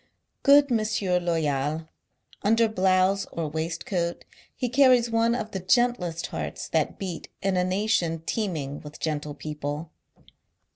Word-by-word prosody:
Good 280 -1 +6
M. 225 -2 +3 0.4
Loyal! 155 -2 -1 0.5
Under 225 +2 +4
blouse 190 -1 +2
or 165 -2 -3
waistcoat, 170 +2 -3 0.3
he 250 - -1
carries 250 -2 +4
one 230 +1 +2
of 220 -3 -4
the 190 - -3
gentlest 185 -4 +1
hearts - - -5
that - - 0
beat 185 -4 -6
in 195 -1 +1
a 180 - +2
nation 185 -4 0
teeming 155 -10 -2
with 150 0 -11
gentle 150 -2 -3
people. 150 +1 -5
185 Hz, 130 wpm, -26 LUFS, 160-225 Hz, 0.5 s, Good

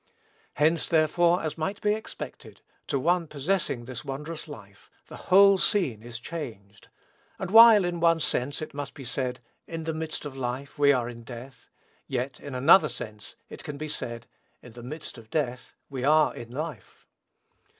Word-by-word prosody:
Hence, 160 +3 +2
therefore, 170 +2 +3
as 155 0 -4
might 195 +6 -2
be 210 0 +2
expected, 220 +1 -8 0.3
to 140 - 0
one 170 +4 +1
possessing 150 -4 -1
this 130 -1 -7
wondrous 150 +4 -6
life, 100 -9 -13 0.2
the - - -9
whole 195 +1 +7
scene 170 - +2
is 120 0 -7
changed; 115 - -8 0.5
and 190 -1 -5
while, 225 -3 +9
in 175 -1 -2
one 165 0 +4
sense, 145 0 -1
it - - -8
must 140 -2 -6
be 135 - -9
said, 125 0 -3 0.3
"in 165 -1 -5
the 160 0 -2
midst 155 -1 -4
of 140 -2 -6
life 130 +2 -5
we 140 -1 +6
are 125 -4 +1
in 120 -1 -8
death," 120 +3 -11 0.4
yet, 130 +1 -3
in 140 -2 -8
another 155 +9 +6
sense, 105 -2 -8
it - - -11
can 145 - -6
be 155 +1 -5
said, 120 -5 -4 0.4
"in 120 - -12
the 120 +2 -11
midst 135 0 -8
of 110 -1 -16
death 125 -5 -3
we 130 -3 -5
are 155 +2 +4
in 115 - -9
life." 140 - -7
145 Hz, 175 wpm, -27 LUFS, 125-165 Hz, 0.5 s, while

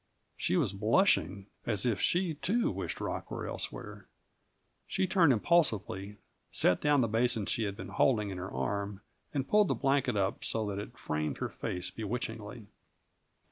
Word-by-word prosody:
She - - 0
was 130 - +1
blushing, 100 - +2 0.2
as 105 -2 0
if 115 -6 +1
she, 175 -1 +2
too, 210 +10 +1
wished - - -4
Rock - - -3
elsewhere. - - -5 0.8
She 190 - +1
turned 175 -5 +4
impulsively, 105 - +1 0.3
set 90 - +2
down 145 -2 +4
the 115 - +2
basin 115 0 +1
she 115 +1 0
had 100 -1 -4
been - - -7
holding 105 -6 +2
in 95 - -5
her 95 - -5
arm, 100 +9 -2 0.3
and 135 -2 -2
pulled 210 -1 +5
the - - +1
blanket 135 -4 +1
up 95 0 0
so 110 -1 -1
that 100 -1 -3
it 110 +3 -8
framed 75 0 -2
her - - -2
face 90 0 -3
bewitchingly. 110 0 -5
110 Hz, 160 wpm, -31 LUFS, 100-140 Hz, 0.8 s, pulled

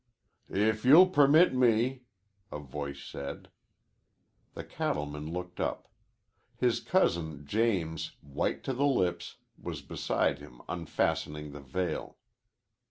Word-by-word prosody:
"If 110 +2 +1
you'll 160 +9 +8
permit 150 +2 +6
me," 125 +1 +2 0.5
a - - -4
voice 70 0 -6
said. 70 - -7 1.1
The - - -6
cattleman 75 +1 -3
looked 90 +1 -6
up. - - -3 0.7
His - - +2
cousin 80 -4 0
James, 80 -5 0
white 70 -1 -2
to 135 - -2
the 140 +3 +2
lips, 90 -11 0 0.2
was - - -6
beside - - -1
him 60 - -13
unfastening 75 -3 -2
the 70 0 -9
veil. 90 +7 -3
90 Hz, 110 wpm, -30 LUFS, 75-125 Hz, 1.1 s, you'll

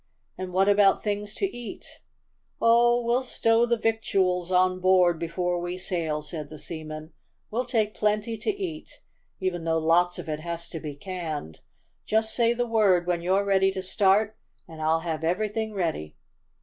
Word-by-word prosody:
"And 185 -1 -6
what 190 +2 +2
about 205 -1 +4
things 210 0 -2
to - - 0
eat?" 240 -1 -8 0.7
"Oh, 240 +1 +4
we'll 240 +2 +2
stow 230 -2 +2
the 235 0 +2
victuals 195 -5 0
on 185 0 +3
board 180 -2 +4
before 175 +1 -1
we 175 +1 -4
sail," 165 -5 -2
said 150 -1 -6
the 155 - -9
seaman. 155 0 -7 0.4
"We'll 245 +4 -1
take 220 -4 0
plenty 215 +2 0
to 215 - -4
eat, 380 -6 -5 0.4
even 185 -3 -2
though 165 0 +1
lots 170 +2 +2
of - - -7
it 155 -1 -3
has 170 +1 -5
to 165 - -6
be 150 -2 -6
canned. 155 - -6 0.5
Just 220 0 +1
say 235 -1 +3
the 240 0 0
word 205 -6 +3
when 175 -1 0
you're 190 +3 +1
ready 195 -1 +3
to 190 -1 -4
start, 200 +3 +2 0.3
and 160 -2 -10
I'll 160 +1 +2
have 160 -2 -3
everything 215 +5 -1
ready." 160 - -2
185 Hz, 170 wpm, -26 LUFS, 170-220 Hz, 0.7 s, about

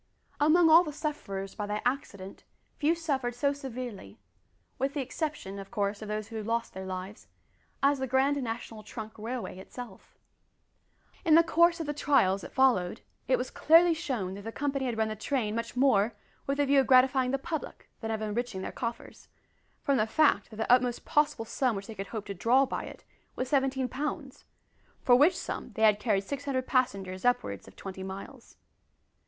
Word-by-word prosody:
Among 325 +3 +5
all 325 +2 +8
the 305 - -5
sufferers 240 -11 -4
by 210 -1 -4
that 210 +1 -3
accident 200 -7 -3 0.4
few 315 +3 +3
suffered 270 -7 -2
so 280 +3 +1
severely 250 - -7 0.6
with 275 +3 -1
the - - -1
exception: 265 - -4
of 195 - -9
course, 205 -2 -2
of 215 - -6
those 215 0 -4
who 225 -2 -5
lost 230 +2 -2
their 190 0 -6
lives 185 +2 -7 0.6
as 280 0 +4
the 265 - -2
Grand 270 +2 +2
National 225 -2 -5
Trunk 215 0 -8
Railway 230 -3 -5
itself. 215 0 -11 1.1
In 320 -4 +5
the 335 - +7
course 340 +1 +3
of 325 - -3
the 295 - -2
trials 270 -10 +2
that - - -9
followed, 240 -7 +2 0.3
it 255 - +3
was 250 - -4
clearly 335 +2 +5
shown 245 - -3
that 200 - -8
the 225 +2 -6
company 275 0 -2
had 235 -2 -2
run 220 0 +1
the 215 - -4
train 215 -1 -1
much 230 +2 -4
more 240 -4 +3 0.3
with 275 0 0
the 290 - +3
view 280 0 +4
of 265 - +2
gratifying 260 0 +5
the 275 - +1
public 315 +3 -6
than 225 - -5
of 220 -1 -2
enriching 215 -2 -3
their - - -4
coffers, 235 -1 -6 0.6
from 280 -1 +2
the 215 -1 +2
fact 280 -5 +3
that 215 - -11
the 225 +2 -1
utmost 250 -1 +2
possible 295 -6 +1
sum 250 0 0
which 195 0 -5
they 225 - -8
could 195 -1 -6
hope 215 -1 -5
to 200 - -5
draw 245 +8 +3
by - - -4
it - - -11 0.3
was 255 0 -3
17 265 -2 +1
pounds, 285 +1 -5 0.6
for 245 - +6
which 310 +8 +5
sum - - -5
they 220 - -1
had 210 -1 +5
carried 210 -3 +1
600 275 +2 -3
passengers 195 -9 0
upwards 245 - 0
of 95 - -15
twenty 190 -1 -8
miles. 190 +1 -9
245 Hz, 190 wpm, -29 LUFS, 210-280 Hz, 1.1 s, all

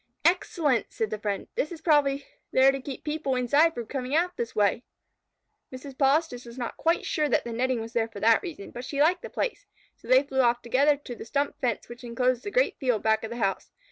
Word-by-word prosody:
"Excellent!" 330 -7 +2
said 220 -1 -2
the 215 - -3
friend. 205 -2 -3
"That 300 - -2
is 335 - -7
probably 290 -3 +2 0.3
there 265 +1 +6
to 270 0 -4
keep 270 0 -7
the 300 - -3
people 300 -4 -1
inside 285 +7 +3
from 235 - -4
coming 260 +3 -3
out 355 +2 +1
this 230 -1 -4
way." 210 +3 +2 0.9
Mrs. 260 +1 -9
Polistes 275 -2 +1
was 235 +1 -11
not 240 -2 -4
quite 330 +1 +1
sure 300 -1 0
that - - +2
the 235 - -5
netting 255 +1 0
was 225 +1 -8
there 230 -2 +1
for 225 -3 -10
that 225 +2 +4
reason, 320 - -8
but 245 - -7
she 280 +2 -4
liked 345 +5 +3
the - - -7
place, - - -3 0.3
so - - -17
they 260 +2 +6
flew 270 -2 0
off 240 -1 +2
together 280 +5 +3
to 255 -4 -8
the - - -8
stump 280 +5 -2
fence 240 -5 -1
which 240 +1 -11
enclosed 245 +1 0
the - - -4
great - - +1
field 250 -7 0
back 220 0 +2
of 225 - -4
the 235 - -6
house. 195 -4 -1
255 Hz, 235 wpm, -27 LUFS, 235-295 Hz, 0.9 s, there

